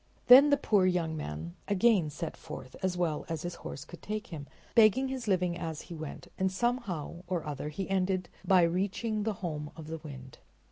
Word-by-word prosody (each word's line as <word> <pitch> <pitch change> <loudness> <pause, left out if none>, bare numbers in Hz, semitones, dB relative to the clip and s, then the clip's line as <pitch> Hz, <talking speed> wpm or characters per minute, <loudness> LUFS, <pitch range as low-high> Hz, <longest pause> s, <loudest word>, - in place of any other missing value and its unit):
Then 270 +4 +10
the 285 - +5
poor 205 -8 +3
young 170 -3 0
man 80 - -5
again 200 -5 +3
set 155 +3 -5
forth 150 -5 -9
as 185 -1 0
well 165 -4 0
as 165 -2 -3
his 175 0 -3
horse 140 - -7
could 175 - -12
take 215 0 -4
him, 145 -3 -6 0.3
begging 235 +4 +5
his 260 -3 -4
living 180 -3 +2
as 165 -3 -4
he - - -10
went, 155 -2 -7
and 190 0 +2
somehow 190 - -2
or 175 -2 -2
other 150 0 -4
he 185 +5 -4
ended 185 -1 0 0.2
by 185 -3 +5
reaching 200 +5 0
the 215 +1 0
home 150 -3 -3
of 160 - -9
the 160 +1 -5
wind. 135 -4 -10
175 Hz, 195 wpm, -30 LUFS, 155-205 Hz, 0.3 s, Then